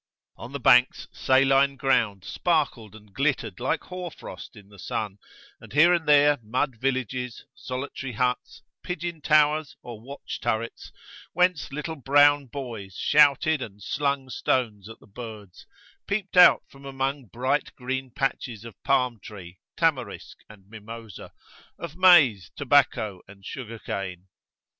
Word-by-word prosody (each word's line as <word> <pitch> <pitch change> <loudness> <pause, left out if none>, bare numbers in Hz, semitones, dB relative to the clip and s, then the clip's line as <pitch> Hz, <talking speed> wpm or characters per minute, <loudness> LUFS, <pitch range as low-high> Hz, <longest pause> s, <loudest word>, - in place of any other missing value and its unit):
On 120 - -10
the 140 - -5
banks, 125 -1 +4
saline 135 +1 +3
ground 115 -8 +1
sparkled 135 - -1
and 105 -2 -17
glittered 130 -6 -1
like 130 - -1
hoar 180 -1 -6
frost 145 - -11
in 100 -2 -15
the 100 -1 -16
sun; 100 +2 -4 0.4
and - - -14
here 165 +5 +6
and 165 -3 -1
there 145 -1 +5
mud 120 +3 -2
villages, 130 -1 -3
solitary 130 0 -6
huts, 125 +4 -2 0.2
pigeon 175 -2 -5
towers, 150 -1 +2
or 115 -3 -9
watch 140 +4 -8
turrets, 115 -1 -3 0.4
whence 180 -2 +1
litt1e 150 0 -6
brown 145 0 +5
boys 115 -8 -7
shouted 150 +1 +3
and 105 -4 -8
slung 140 +1 -1
stones 110 -6 -1
at 115 - -12
the - - -19
birds, 105 -3 -11 0.4
peeped 200 -1 -3
out 180 -1 +7
from 135 0 -17
among 135 0 -3
bright 130 +7 -1
green 130 +1 -4
patches 120 -3 -3
of 115 -5 -12
palm 125 -4 +1
tree, 95 -4 -11 0.2
tamarisk, - - -1
and 100 -3 -16
mimosa, 115 -1 -10 0.5
of 170 -2 -8
maize, 150 - +5
tobacco, 125 -8 +2
and 100 -1 -16
sugar 115 -3 -7
cane. 95 -3 -6
130 Hz, 140 wpm, -25 LUFS, 110-145 Hz, 0.5 s, out